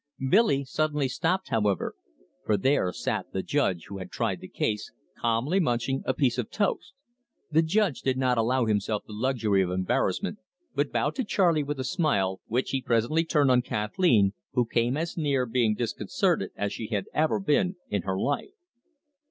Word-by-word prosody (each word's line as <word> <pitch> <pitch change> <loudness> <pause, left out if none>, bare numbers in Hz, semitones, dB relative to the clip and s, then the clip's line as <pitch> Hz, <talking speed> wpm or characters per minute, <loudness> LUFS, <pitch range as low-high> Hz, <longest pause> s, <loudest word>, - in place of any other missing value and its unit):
Billy 185 -10 +4
suddenly 150 0 0
stopped, 165 +9 -1
however, 105 -5 0 0.5
for 105 - +2
there 130 -5 +2
sat - - -3
the 95 - -2
judge 95 - 0
who 100 -1 -7
had 95 -1 -7
tried 110 -6 -2
the - - -8
case, 105 +2 -2 0.3
calmly 120 +11 +1
munching 135 -3 0
a 130 - +2
piece 130 -3 +1
of 120 - -2
toast. 205 +4 -2 0.6
The 160 +1 +5
judge 180 - +1
did 130 -1 0
not 130 -1 +2
allow 125 +2 +2
himself 105 -1 0
the 105 - -10
luxury 110 -4 +1
of 90 - 0
embarrassment, 95 - -1 0.3
but - - 0
bowed - - 0
to 260 - +1
Charley 175 -7 +2
with 145 -1 -4
a - - -1
smile, 125 - 0
which 125 +4 -1
he 135 - 0
presently 120 +7 +1
turned 145 -5 +3
on 125 -1 +5
Kathleen, 105 - +2 0.2
who 125 -2 +2
came 120 +3 0
as 165 +2 -3
near 140 -5 +1
being 115 -2 +1
disconcerted 115 0 0
as 100 0 -2
she 110 - -5
had 105 -4 -2
ever 155 +5 +2
been 185 +1 +1
in 100 -2 0
her 95 +1 -2
life. 145 - -2
125 Hz, 175 wpm, -27 LUFS, 105-150 Hz, 0.6 s, The